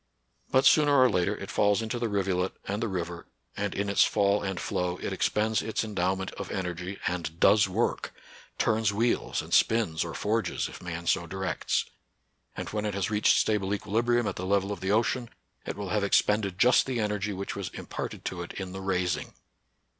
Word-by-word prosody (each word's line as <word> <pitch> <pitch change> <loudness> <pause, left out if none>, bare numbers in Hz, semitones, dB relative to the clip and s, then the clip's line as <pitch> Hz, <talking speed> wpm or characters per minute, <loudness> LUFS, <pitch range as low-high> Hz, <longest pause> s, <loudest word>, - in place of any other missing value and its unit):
But 130 - +3
sooner 145 -2 +6
or 130 - +7
later 100 +2 +1
it 95 -1 -7
falls 100 +3 +3
into 115 +2 -3
the 115 -1 -1
rivulet 95 -2 0
and 100 +3 -2
the 115 - 0
river, 85 -3 -4 0.3
and 100 -1 -2
in 100 +1 -1
its 100 - +4
fall 100 -1 +2
and 95 -2 -3
flow 90 0 -2
it - - -4
expends 110 +1 +1
its 110 0 -2
endow 95 -4 0
ment 95 0 -5
of - - -5
energy, 90 +1 -4
and 85 -2 -3
does 105 -2 +5
work, 110 +6 -1 0.2
— - - -22
turns 110 -2 +2
wheels 115 +4 0
and - - -7
spins 105 -8 +3
or 85 -1 -6
forges, 105 -3 -1
if - - -11
man 85 -1 -5
so 85 +1 +1
directs, 95 -1 -1 0.4
— - - -32
and, - - -4
when 105 0 -2
it 105 - -2
has 100 0 -1
reached 105 0 +4
stable 105 -2 +1
equilibrium 120 +4 +1
at 100 - -3
the 90 - -4
level 100 0 +1
of 100 - -4
the 95 +1 -1
ocean, 115 +2 +1 0.4
it - - -4
will 100 -2 -4
have 105 -2 0
expended 100 -1 +2
just 125 +5 +5
the 130 -3 -1
energy 105 -1 -1
which 100 0 -4
was 100 -3 -4
imparted - - -6
to 90 - -3
it 85 - -7
in 95 -2 -5
the 95 +1 -6
rais 90 -2 0
ing. - - -9
100 Hz, 205 wpm, -28 LUFS, 90-110 Hz, 0.4 s, or